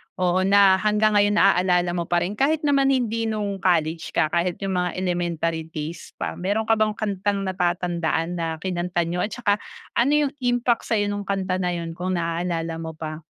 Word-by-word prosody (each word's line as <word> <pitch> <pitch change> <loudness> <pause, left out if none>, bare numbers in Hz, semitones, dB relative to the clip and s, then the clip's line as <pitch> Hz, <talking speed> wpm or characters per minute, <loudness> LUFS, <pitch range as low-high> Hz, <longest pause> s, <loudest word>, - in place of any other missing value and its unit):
oo, 185 +1 +1
na 195 -1 +6
hanggang 215 +1 +2
ngayon 205 0 +4
naalala 180 -3 +3
mo 170 -1 -3
pa 175 0 +1
rin 200 +4 -4
kahit 305 +3 +2
naman 275 -2 +3
hindi 230 -4 +1
no'ng 205 -3 -2
college 165 -3 0
ka, 155 - +2
kahit 175 +1 0
yung 195 - -1
mga 180 -1 -2
elementary 170 -3 -2
days 160 +1 -7
pa. - - -5
Meron 205 +5 0
ka 225 0 +3
bang 215 -1 +1
kantang 200 -1 -1
natatandaan 175 -3 -1
na 165 - -1 0.2
kinanta 175 -1 -1
niyo 170 +2 -3
at 210 - -1
tsaka 205 -4 +1 0.4
ano 250 +5 +3 0.2
yung 275 - -8
impact 245 -1 +1
sa'yo 205 -2 +1
nong 205 -1 -4
kanta 190 -2 -1
na 180 -1 -1
'yon 165 -1 -4
kung 180 +2 -3
naaalala 165 -1 -2
mo 160 -1 -6
pa. 155 0 -6
185 Hz, 190 wpm, -23 LUFS, 170-210 Hz, 0.4 s, na